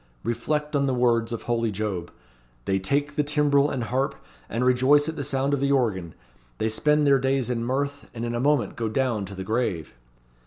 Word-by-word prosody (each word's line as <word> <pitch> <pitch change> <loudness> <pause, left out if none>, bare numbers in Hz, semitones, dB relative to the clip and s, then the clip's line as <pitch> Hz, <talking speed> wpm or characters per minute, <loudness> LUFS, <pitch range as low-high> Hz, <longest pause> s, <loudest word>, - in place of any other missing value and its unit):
Reflect 150 +6 -2
on 140 -1 +2
the 130 - +1
words 120 -2 +2
of 115 - -4
holy 115 -1 0
Job, 100 -4 -3 0.6
'They 95 0 +1
take 145 +9 -1
the 150 - +2
timbrel 145 -1 +3
and 125 -3 -2
harp, 135 +4 -1 0.3
and 120 +2 -1
rejoice 130 +4 +4
at 160 - -3
the 145 - -3
sound 135 0 0
of 140 - +1
the 140 +1 +1
organ. 100 - 0 0.4
They 110 - 0
spend 150 +6 +2
their 140 -1 +5
days 130 -1 0
in 115 -1 -1
mirth, 140 +3 -2
and 115 0 -5
in 120 - -3
a 120 - -1
moment 140 -5 +1
go 115 -2 -2
down, 115 -3 0
to 100 +1 -9
the 95 - -5
grave.' 110 -7 -2
125 Hz, 205 wpm, -25 LUFS, 115-140 Hz, 0.6 s, their